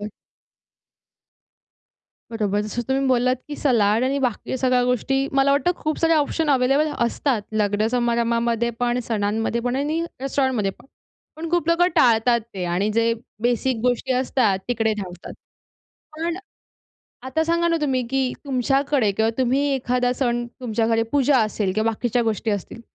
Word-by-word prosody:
हो. 205 Hz, -, -5 dB, 2.2 s
बरोबर 210 Hz, -3 st, -1 dB
जसं 215 Hz, +3 st, -3 dB
तुम्ही 270 Hz, +1 st, +1 dB
बोललात, 255 Hz, 0 st, +2 dB
की 290 Hz, -, -5 dB
सलाड 225 Hz, -4 st, +2 dB
आणि 270 Hz, +2 st, 0 dB
बाकी 250 Hz, 0 st, -2 dB
सगळ्या 255 Hz, -1 st, +2 dB
गोष्टी 270 Hz, +2 st, 0 dB
मला 275 Hz, 0 st, +3 dB
वाटतं 325 Hz, +6 st, +2 dB
खूप 310 Hz, 0 st, -3 dB
सारे 330 Hz, 0 st, +2 dB
ऑप्शन 305 Hz, +1 st, +1 dB
अवेलेबल 275 Hz, +3 st, +3 dB, 0.2 s
असतात. 235 Hz, -1 st, -1 dB
लग्न 210 Hz, 0 st, +1 dB
समारंभामध्ये 235 Hz, -1 st, +1 dB
पण, 245 Hz, 0 st, +1 dB
सणांमध्ये 225 Hz, +1 st, -1 dB
पण 245 Hz, +1 st, -1 dB
आणि 300 Hz, +4 st, -1 dB, 0.2 s
रेस्टॉरंटमध्ये 260 Hz, -6 st, 0 dB
पण. -, -, -19 dB, 0.5 s
पण 325 Hz, +1 st, -5 dB
खूप 345 Hz, -2 st, 0 dB
लोकं 345 Hz, +1 st, +4 dB
टाळतात 235 Hz, 0 st, +4 dB
ते 185 Hz, -2 st, -3 dB
आणि 180 Hz, +4 st, 0 dB
जे 230 Hz, +1 st, +2 dB, 0.3 s
बेसिक 245 Hz, +1 st, +1 dB
गोष्टी 250 Hz, +1 st, 0 dB
असतात 250 Hz, -6 st, +1 dB
तिकडे 225 Hz, -2 st, +1 dB
धावतात. 180 Hz, -4 st, -7 dB, 0.8 s
पण 335 Hz, +2 st, -2 dB, 0.9 s
आता 320 Hz, +5 st, 0 dB
सांगा 340 Hz, +1 st, +1 dB
ना 335 Hz, -, +2 dB
तुम्ही, 265 Hz, -4 st, 0 dB
की 265 Hz, -2 st, 0 dB
तुमच्याकडे 270 Hz, -2 st, +1 dB
किंवा 220 Hz, +3 st, +1 dB
तुम्ही 260 Hz, +2 st, +2 dB
एखादा 250 Hz, -1 st, 0 dB
सण 240 Hz, -2 st, -1 dB
तुमच्याकडे 225 Hz, -1 st, 0 dB
पूजा 280 Hz, -1 st, +3 dB
असेल 215 Hz, -3 st, 0 dB
किंवा 220 Hz, +1 st, +1 dB
बाकीच्या 240 Hz, +2 st, -1 dB
गोष्टी 225 Hz, 0 st, -1 dB
असतील, 205 Hz, +2 st, -4 dB
245 Hz, 145 wpm, -22 LUFS, 225-270 Hz, 2.2 s, लोकं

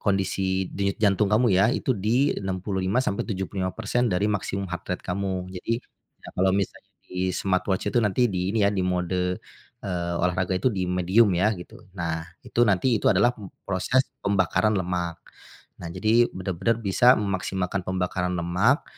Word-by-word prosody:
kondisi 95 Hz, -1 st, 0 dB
denyut 100 Hz, 0 st, -1 dB
jantung 100 Hz, 0 st, +3 dB
kamu 110 Hz, +2 st, +3 dB
ya, 95 Hz, +4 st, +4 dB
itu 130 Hz, +1 st, 0 dB
di 115 Hz, +7 st, +2 dB
65%-75% 95 Hz, +3 st, -1 dB
dari 90 Hz, +1 st, 0 dB
maksimum 100 Hz, 0 st, -2 dB
heart 85 Hz, -1 st, -6 dB
rate -, -, -25 dB
kamu. 95 Hz, 0 st, -3 dB
Jadi, 115 Hz, -, -2 dB, 0.5 s
ya -, -, -9 dB
kalau 95 Hz, +1 st, +3 dB
misalnya 100 Hz, -, -3 dB, 0.2 s
di 90 Hz, 0 st, -2 dB
smartwatch 95 Hz, 0 st, 0 dB
itu 120 Hz, -, +3 dB
nanti 105 Hz, +5 st, +2 dB
di 90 Hz, 0 st, -1 dB
ini 110 Hz, -2 st, +2 dB
ya, -, -, +3 dB
di 95 Hz, -, -1 dB
mode, 90 Hz, 0 st, 0 dB, 0.5 s
eee, 85 Hz, -2 st, -2 dB
olahraga 90 Hz, +1 st, 0 dB
itu 130 Hz, -, +2 dB
di 95 Hz, -2 st, -2 dB
medium 95 Hz, +4 st, +3 dB
ya 105 Hz, +5 st, +3 dB
gitu, 90 Hz, -, -12 dB
nah, 80 Hz, -2 st, -2 dB, 0.2 s
itu 120 Hz, -, -2 dB
nanti 110 Hz, +5 st, +3 dB
itu -, -, -2 dB
adalah, 105 Hz, +6 st, +4 dB
mmm, 100 Hz, -4 st, -10 dB
proses 100 Hz, +7 st, +1 dB, 0.2 s
pembakaran 100 Hz, +2 st, +2 dB
lemak. 90 Hz, -2 st, -2 dB, 0.6 s
Nah 85 Hz, -, -6 dB
jadi 110 Hz, +6 st, +3 dB
benar-benar 95 Hz, +4 st, -1 dB
bisa 120 Hz, +5 st, +5 dB
memaksimalkan 95 Hz, -1 st, -2 dB
pembakaran 90 Hz, -1 st, -1 dB
lemak, 95 Hz, -, +2 dB
95 Hz, 155 wpm, -25 LUFS, 90-105 Hz, 0.6 s, bisa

